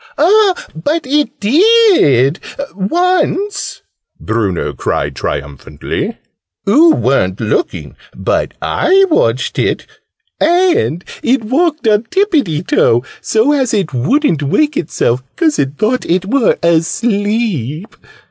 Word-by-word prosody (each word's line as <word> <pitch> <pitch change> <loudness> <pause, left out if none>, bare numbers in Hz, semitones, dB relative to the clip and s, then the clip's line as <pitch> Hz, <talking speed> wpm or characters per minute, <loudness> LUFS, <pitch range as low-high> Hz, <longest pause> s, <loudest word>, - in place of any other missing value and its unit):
"Ah, 385 +4 +3
but 295 - -2
it 285 0 -1
did, 270 - +4 0.3
once!" 365 - -1 0.4
Bruno 105 -5 -2
cried 70 -1 -3
triumphantly. 70 +1 -5 0.5
"Oo 315 +10 +5
weren't 95 -8 0
looking 115 - -2 0.2
but - - -2
I 390 +1 +3
watched 120 - 0
it. - - -1 0.5
And 340 - +1 0.2
it 250 0 +1
walked 295 +3 0
on 215 +1 +2
tippiety 285 - 0
toe, 120 +2 +2 0.2
so 225 +6 +1
as 265 -6 +1
it 190 -9 -2
wouldn't 160 - +1
wake 295 - +1
itself, 130 - -1
'cause 315 -3 +1
it 140 +1 -2
thought 240 +4 0
it 180 +2 0
were 240 +2 +1
asleep. 200 - -1
220 Hz, 110 wpm, -14 LUFS, -, 0.5 s, Oo